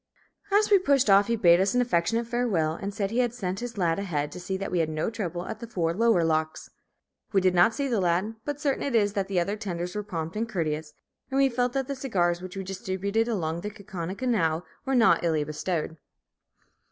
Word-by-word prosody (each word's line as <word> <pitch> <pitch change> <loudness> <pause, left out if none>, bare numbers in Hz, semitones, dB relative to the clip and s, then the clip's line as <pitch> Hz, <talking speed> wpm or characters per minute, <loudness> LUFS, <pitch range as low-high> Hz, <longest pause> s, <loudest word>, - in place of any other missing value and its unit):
As 420 +1 +3
we 400 - +7
pushed 275 - +3
off 200 +1 +6
he 235 - +1
bade 175 -5 +5
us 195 +4 +1
an 250 - +4
affectionate 230 0 +1
farewell, 225 -10 0
and 195 +5 -5
said 200 -1 -2
he 235 - 0
had 240 -1 +1
sent 190 -5 -3
his 245 -2 -6
"lad" 170 -2 +1
ahead 150 -7 -2
to 180 - -8
see 190 +2 -3
that 195 +1 -5
we 180 - +1
had 160 -1 +1
no 155 +7 -2
trouble 180 -6 -4
at 220 - -6
the 235 - -7
four 170 -7 -1
lower 225 -2 +3
locks. 155 -1 -1 0.6
We 195 - +5
did 185 -1 +2
not 180 +6 +4
see 280 0 -1
the 230 -6 0
lad; 180 +5 +1
but 290 -1 -4
certain 285 -2 0
it 275 -4 -1
is 205 -2 +3
that 195 -2 -1
the 195 -2 0
other 195 +4 -1
tenders 180 -4 -4
were 210 - -1
prompt 165 -5 -5
and 225 +2 -2
courteous, 155 -5 -2 0.4
and 265 - -1
we 275 0 +4
felt 245 0 0
that 270 -1 0
the 280 - -2
cigars 180 -10 0
which 185 +1 -8
we 195 - -3
distributed 195 +3 -2
along 170 -7 -2
the 210 - -4
Kaukauna 190 -3 -6
Canal 180 -10 0 0.2
were 270 0 0
not 230 -6 +4
illy 160 -3 +1
bestowed. 160 +2 -3
195 Hz, 230 wpm, -27 LUFS, 170-230 Hz, 0.6 s, we